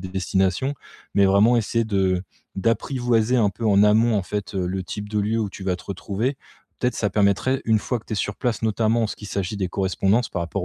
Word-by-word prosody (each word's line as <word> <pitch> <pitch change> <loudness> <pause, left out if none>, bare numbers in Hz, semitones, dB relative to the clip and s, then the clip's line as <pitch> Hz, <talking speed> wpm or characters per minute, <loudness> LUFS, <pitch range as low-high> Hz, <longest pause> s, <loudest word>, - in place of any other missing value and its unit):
destinations, 95 +7 0 0.4
mais 100 - +5
vraiment 105 +5 +5
essayer 115 +1 0
de 95 -3 +1 0.3
d'apprivoiser 120 +2 +1
un 105 -4 +3
peu 110 +4 -4
en 100 -1 +5
amont, 110 +2 +4
en 100 - 0
fait, 105 +1 -5
heu, 95 -2 -1
le 95 +1 -2
type 105 +3 -6
de 105 - 0
lieu 110 +2 0
où 105 -3 -1
tu 95 - -10
vas 95 -1 0
te - - -15
retrouver, 105 +7 -3 0.4
peut-être 125 -1 0
ça 105 - -1
permettrait 105 +6 +2
une 110 -1 +4
fois 120 +3 -2
que - - -19
tu - - -3
es - - -4
sur 105 +1 -2
place, 120 -2 -2
notamment, 110 +1 +1
en 110 - +2
ce - - -5
qu'il 105 - -10
s'agit 100 +2 -3
des 95 -2 -1
correspondances 100 +4 +1
par 90 - -3
rapport 85 +3 -3
105 Hz, 230 wpm, -23 LUFS, 95-115 Hz, 0.4 s, mais